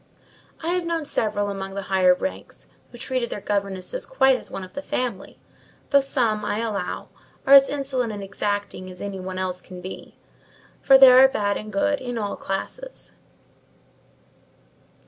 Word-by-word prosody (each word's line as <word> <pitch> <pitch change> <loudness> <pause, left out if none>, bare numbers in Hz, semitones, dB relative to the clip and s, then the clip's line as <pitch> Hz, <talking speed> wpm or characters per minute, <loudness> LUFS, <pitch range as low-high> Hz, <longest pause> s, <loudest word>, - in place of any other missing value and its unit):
I 330 - -1
have 360 0 0
known 335 -2 -2
several 205 -6 0
among 195 0 -6
the 200 - -4
higher 185 -2 +4
ranks 280 - -6 0.2
who 240 - -11
treated 250 -1 -2
their - - -5
governesses 200 - -3
quite 270 - +4
as - - -6
one 195 - -6
of 185 - -11
the 285 - -5
family; 245 -8 -4 0.5
though 280 -1 +6
some, 235 -6 0
I 210 - -1
allow, 210 -5 -3 0.4
are 275 - +5
as 275 0 +9
insolent 265 -4 -2
and 205 -1 -6
exacting 200 -1 -3
as 180 -1 -12
any 200 -1 -5
one 185 0 -6
else 185 -1 -3
can 180 0 -11
be: 185 +1 -9 0.7
for 270 - +7
there 260 -1 +9
are - - +9
bad 205 -6 -1
and 215 0 -6
good 285 +9 0
in 245 -2 -4
all 205 -2 -2
classes." - - -5
210 Hz, 165 wpm, -23 LUFS, 195-265 Hz, 0.7 s, as